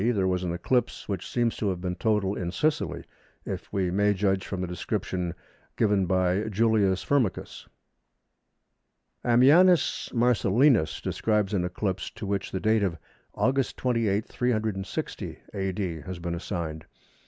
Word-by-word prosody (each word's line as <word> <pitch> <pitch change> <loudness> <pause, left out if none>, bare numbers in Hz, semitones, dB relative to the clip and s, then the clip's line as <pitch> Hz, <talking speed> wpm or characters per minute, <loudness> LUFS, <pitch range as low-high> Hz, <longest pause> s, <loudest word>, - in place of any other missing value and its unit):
there 95 -2 +1
was 90 0 0
an 90 - -1
eclipse, 120 +8 -1
which 95 -3 -4
seems 120 -2 0
to 105 - -1
have 90 -2 -2
been 90 0 -2
total 105 0 +1
in 85 -1 -3
Sicily, 150 - -1 0.4
if - - -6
we 95 -3 0
may 105 +2 +2
judge 95 -1 0
from 95 - -4
the 90 - -1
description 90 0 -3 0.4
given 100 -4 +2
by 95 +1 +2
Julius 105 -3 +2
Firmicus. 130 -9 -1 1.6
Ammianus 150 +9 +4
Marcellinus 120 - +3
describes 105 -2 0
an 95 -3 +1
eclipse, 95 +1 -2
to - - -8
which 100 0 -2
the 95 - -2
date 110 +2 +2
of 90 -5 0 0.4
August 135 0 +1
28, 115 -5 +1
360 110 -6 -2 0.2
A.D., 95 -4 -2
has 90 +5 -6
been 85 0 -4
assigned. 85 -3 -4
100 Hz, 140 wpm, -27 LUFS, 90-110 Hz, 1.6 s, Ammianus